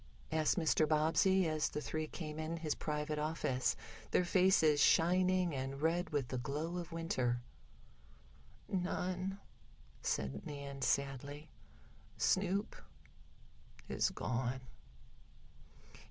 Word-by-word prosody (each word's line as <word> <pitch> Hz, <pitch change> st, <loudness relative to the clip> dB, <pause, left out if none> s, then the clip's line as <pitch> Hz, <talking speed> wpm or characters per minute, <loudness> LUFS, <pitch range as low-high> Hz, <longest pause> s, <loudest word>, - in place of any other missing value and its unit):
asked 155 Hz, +2 st, +2 dB
Mr. 160 Hz, -2 st, +3 dB
Bobbsey, 165 Hz, +4 st, +4 dB
as 155 Hz, -1 st, 0 dB
the -, -, -3 dB
three 155 Hz, +1 st, -3 dB
came 155 Hz, -2 st, -6 dB
in 160 Hz, +1 st, -3 dB
his 155 Hz, -3 st, -1 dB
private 150 Hz, 0 st, -2 dB
office, 150 Hz, -4 st, 0 dB, 0.3 s
their 180 Hz, -, +3 dB
faces 175 Hz, -5 st, +4 dB
shining 180 Hz, +1 st, +4 dB
and 135 Hz, 0 st, -3 dB
red 165 Hz, +3 st, +1 dB
with 145 Hz, -6 st, -1 dB
the 130 Hz, -, -2 dB
glow 150 Hz, +7 st, -3 dB
of 170 Hz, -2 st, -7 dB
winter. 130 Hz, -7 st, 0 dB, 1.3 s
"None," 185 Hz, +1 st, -2 dB, 0.6 s
said 70 Hz, +1 st, -2 dB
Nan 140 Hz, -1 st, -6 dB
sadly. 140 Hz, +3 st, -1 dB, 0.7 s
"Snoop 195 Hz, +2 st, +1 dB, 1.1 s
is -, -, +1 dB
gone." 125 Hz, +1 st, -2 dB
155 Hz, 105 wpm, -36 LUFS, 140-175 Hz, 1.3 s, Bobbsey